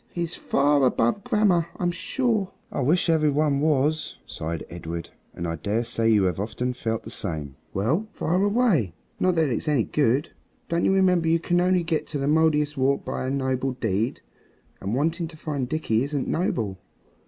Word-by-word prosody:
He's 170 -1 -3
far 140 0 +2
above 125 - +2
grammar, 210 -8 +2
I'm 175 -1 0
sure." 215 +1 -1 0.2
"I - - -2
wish 160 +9 +2
every 160 -2 +3
one 145 -1 +2
was," 150 +1 +1
sighed 80 +1 -5
Edred, 85 -1 -6 0.2
and 85 - -3
I 85 0 -3
dare 105 +8 -1
say 115 -1 0
you 105 -3 +4
have 90 -2 0
often 125 +5 -2
felt 115 -2 -3
the - - -8
same. 75 -8 -4 0.2
"Well, 140 - 0
fire 180 +4 0
away! 200 - +2 0.2
Not 185 -1 +2
that 160 -3 +2
it's 120 +5 -2
any 145 -6 +3
good. 140 +1 +1 0.4
Don't 170 0 +1
you - - +4
remember 185 -3 +3
you 165 +1 +3
can 175 +1 +1
only 180 -1 +3
get 165 -2 -2
at - - 0
the - - 0
Mouldiestwarp 150 -3 +2
by 130 - -3
a - - 0
noble 130 -1 -1
deed? 110 -1 -1 0.6
And 100 +4 -2
wanting 165 +5 0
to 160 -1 -12
find 140 -5 -3
Dickie 130 -7 +1
isn't 140 -1 -2
noble." 110 - -1
145 Hz, 180 wpm, -25 LUFS, 115-170 Hz, 0.6 s, you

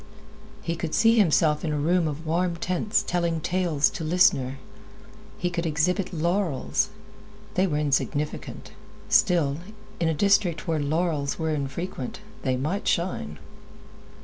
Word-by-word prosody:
He 165 0 -2
could 165 -1 -3
see 225 +1 +5
himself 155 -5 +3
in 160 - -1
a 150 - -1
room 165 +3 +2
of 155 +2 -5
warm 170 +2 0
tints 180 +4 0
telling 170 -2 0
tales 170 -3 +1
to 165 - -5
listeners. 155 -6 +3 0.8
He 175 0 -1
could 170 -1 -2
exhibit 175 +5 0
laurels. 175 +3 0 0.6
They 185 +1 +2
were 150 -4 -1
insignificant; 150 0 -2 0.4
still, 165 -8 +3 0.4
in 165 - +1
a 160 - 0
district 190 -1 +2
where 160 -2 +1
laurels 150 -1 0
were 160 -1 -1
infrequent, 140 -1 -4 0.2
they 130 -2 0
might 160 +11 -2
shine. 75 - -1
165 Hz, 135 wpm, -25 LUFS, 150-180 Hz, 0.8 s, see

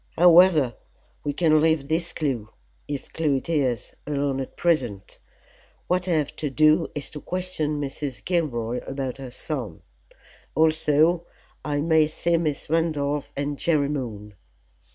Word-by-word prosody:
"However, 170 -7 +6 0.5
we 145 - -1
can 155 0 +3
leave 160 -3 +2
this 165 +3 0
clue, 125 -9 -2 0.4
if 145 -2 -6
clue 155 -4 +1
it 135 - -3
is, 135 -9 0
alone 140 -2 -1
at 130 - -8
present. 125 - -1 0.7
What 180 0 0
I 180 - +2
have 150 -3 0
to 150 - -2
do 155 +4 +4
is 145 - -6
to 150 - -8
question 180 -5 -2
Mrs. 140 -1 -5
Gilroy 125 -9 -1
about 135 -2 -4
her 135 -2 -7
son. 120 - -5 0.7
Also 160 +2 +3 0.4
I 145 -1 -1
may 160 -1 +4
see 170 +2 0
Miss 155 -4 -2
Randolph 150 -3 0
and 145 0 -2
Jerry 150 -4 +2
Moon. 110 -8 -5
150 Hz, 140 wpm, -24 LUFS, 135-160 Hz, 0.7 s, However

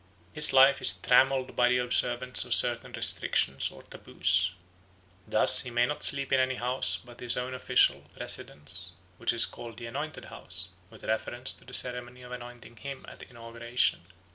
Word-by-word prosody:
His 150 - +7
life 135 +1 +5
is 130 - +5
trammelled 130 +1 +2
by 125 0 +3
the 125 - +2
observance 125 0 +1
of - - +2
certain - - +1
restrictions 70 0 0
or - - -14
taboos. 90 +1 -1 0.8
Thus 105 -1 +5
he 125 - -4
may 120 0 +1
not 150 +3 -4
sleep 140 -1 0
in 135 - +4
any 130 0 0
house 125 -7 -1
but 120 -1 -15
his 120 -1 0
own 125 +1 -4
official 130 - +2 0.2
residence, 90 +5 -4 0.3
which - - 0
is 120 -1 +3
called 115 -2 -10
the 120 - -8
"anointed 145 +6 -6
house" 90 +1 -8 0.2
with 110 -1 -16
reference 120 +3 -1
to - - -15
the 125 - -14
ceremony 125 0 -1
of 125 - -12
anointing 120 -2 -11
him 140 +2 -8
at - - -12
inauguration. 115 -5 -3
125 Hz, 170 wpm, -28 LUFS, 115-130 Hz, 0.8 s, His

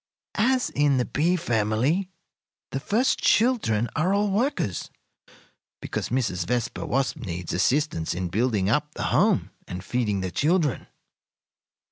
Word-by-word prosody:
"As 255 +2 +2
in 145 -2 +2
the 125 - +1
bee 170 +5 +1
family, 125 - 0 0.6
the 135 - -2
first 225 - +1
children 205 - +2
are 180 +5 +2
all 205 0 +1
workers, 210 - -1 0.9
because - - -4
Mrs. 100 -9 -1
Vespa 120 +1 -2
Wasp 135 +1 0
needs 85 -6 -5
assistance 120 - +1
in 90 0 -3
building 105 -1 +1
up 150 +7 0
the - - -3
home - - +2 0.2
and 90 +1 -6
feeding 105 -4 -1
the 95 -1 -3
children. 150 - +1
130 Hz, 130 wpm, -25 LUFS, 105-175 Hz, 0.9 s, As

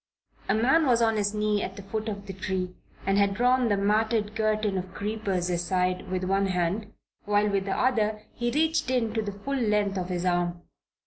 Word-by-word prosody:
A 195 - +4
man 265 +8 +3
was 240 -2 +4
on 225 -1 +3
his 205 0 0
knees 210 -1 +1
at 190 - -4
the 200 - -9
foot 215 +3 -3
of 200 -1 -6
the 195 - -6
tree 185 -1 -3 0.3
and 195 +1 +2
had 200 -1 +2
drawn 250 +2 +3
the 205 - +2
matted 210 +1 +1
curtain 215 -2 +1
of 185 +1 -8
creepers 200 -4 -2
aside 180 +1 0
with 185 0 -2
one 195 +1 +1
hand 185 +4 -1 0.3
while 205 0 +2
with 200 -2 0
the 195 - -1
other 215 -4 +1
he 240 0 -1
reached 315 +2 +1
in 240 -4 +1
to 225 - 0
the 210 -1 -3
full 205 +8 -5
length 210 -6 +1
of 180 0 -4
his 180 0 -2
arm. 175 -1 0
205 Hz, 205 wpm, -27 LUFS, 190-220 Hz, 0.3 s, A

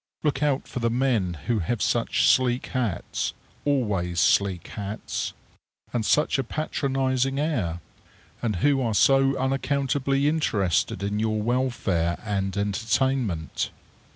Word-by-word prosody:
Look 145 -3 0
out 145 -2 +1
for - - -5
the 115 -1 +1
men 115 -8 +1
who 115 -3 +1
have 105 +6 -1
such - - +2
sleek 125 -1 +3
hats 115 -9 -2 0.3
always 100 -11 0
sleek 95 0 +2
hats 105 0 -4 0.6
and 120 - 0
such 150 +4 +2
a - - +1
patronizing 135 -1 -1
air, 105 - -1 0.6
and 110 -4 0
who 140 -2 +3
are 115 -4 0
so 135 +5 +4
unaccountably 135 +1 0
interested 100 - +1
in 100 +1 -1
your 110 -1 0
welfare 110 -8 0
and 100 -1 -2
entertainment. 110 - 0
120 Hz, 125 wpm, -25 LUFS, 100-135 Hz, 0.6 s, so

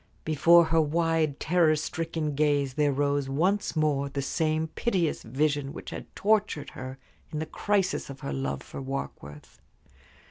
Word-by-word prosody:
Before 165 +3 +6
her 165 0 +3
wide, 160 -1 +1
terror 165 -2 +3
stricken 160 0 -3
gaze 145 -2 +1
there 145 0 +2
rose 140 0 0
once 180 +10 +1
more 145 -3 +1
the 140 0 -3
same 155 +2 0
piteous 180 -5 0
vision 140 +3 -1
which - - -8
had - - -7
tortured 210 -7 +1
her 130 +1 -7 0.3
in 155 - -5
the 155 - -2
crisis 195 +1 0
of 135 0 -9
her 140 - -4
love 135 0 -3
for - - -8
Warkworth. 105 - -7
155 Hz, 150 wpm, -27 LUFS, 140-165 Hz, 0.3 s, Before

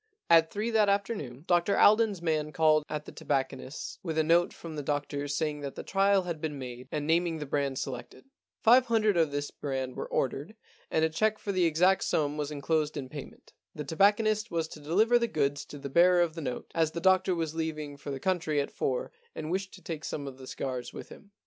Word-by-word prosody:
At 165 -1 +6
three 215 +5 -2
that 215 -2 +4
afternoon 195 - -2
Dr 175 +2 +2
Alden's 210 -4 +4
man 155 -2 0
called 155 -1 +3
at 150 -1 -4
the - - -9
tobacconist's 135 +1 -3
with 160 -3 -4
a 160 - +4
note 170 +2 +3
from 165 -2 -9
the 150 - -3
doctor 145 0 -2
saying 150 +1 -1
that 140 -1 -5
the - - -6
trial 195 0 +3
had 170 -3 -5
been 150 -2 -3
made 125 -1 -8
and 150 -1 -2
naming 165 +1 +2
the 150 - -5
brand 140 -1 -1
selected. 125 - -6 0.4
Five 245 +3 +6
hundred 215 -3 +3
of 165 -3 +3
this 145 0 -3
brand 130 -2 -4
were - - -4
ordered, 140 - -2 0.3
and 160 - +2
a - - +1
cheque 215 +7 +1
for 205 - -4
the 185 -2 +2
exact 180 +4 +3
sum 145 -1 0
was 150 -1 -3
enclosed 150 +1 -1
in 130 -2 -5
payment. 145 -1 -10 0.2
The 150 - -4
tobacconist 210 +7 +2
was 165 -1 -1
to 155 - -10
deliver 210 +11 +3
the 235 - +1
goods 145 -6 -1
to 145 - -10
the 140 0 -6
bearer 175 +5 +5
of 165 -2 -2
the 165 - -6
note, 125 -4 -5
as 160 -2 +1
the 170 - -3
doctor 185 +1 +3
was 165 -2 -2
leaving 155 -3 -4
for 140 - -9
the 135 -1 -4
country 165 -3 0
at 140 - -2
four - - -2 0.2
and 155 - -5
wished 190 +1 -2
to 185 - -16
take 160 -2 -5
some 145 - -4
of 135 -1 -8
the 130 - -10
cigars 130 -2 -4
with - - -9
him. 205 - -14
160 Hz, 225 wpm, -29 LUFS, 145-185 Hz, 0.4 s, At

